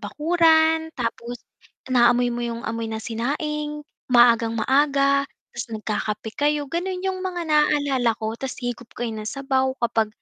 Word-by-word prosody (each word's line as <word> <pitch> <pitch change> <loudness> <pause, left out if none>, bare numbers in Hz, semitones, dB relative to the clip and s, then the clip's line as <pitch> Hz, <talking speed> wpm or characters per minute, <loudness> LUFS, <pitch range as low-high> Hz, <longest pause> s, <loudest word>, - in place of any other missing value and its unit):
bakuran, 320 +5 +3
tapos 240 +1 -4 0.6
naamoy 245 0 +4
mo 240 - -4
'yung, 235 -1 -4
amoy 230 0 -3
na 220 - -4
sinaing, 295 +6 -3 0.2
maagang-maaga, 265 +4 +3 0.2
'tas - - -5
nagkakape 215 0 -3
kayo. 295 +3 0
Gano'n 360 +5 -3
'yung 375 -1 -2
mga 360 -2 -3
naalala 285 -6 +2
ko, 220 0 -3
'tas 265 +2 -5
higop 245 -1 -5
kayo 235 -2 -3
ng 215 0 -5
sabaw, 265 -1 0
kapag 225 -2 +1
260 Hz, 135 wpm, -23 LUFS, 230-300 Hz, 0.6 s, naamoy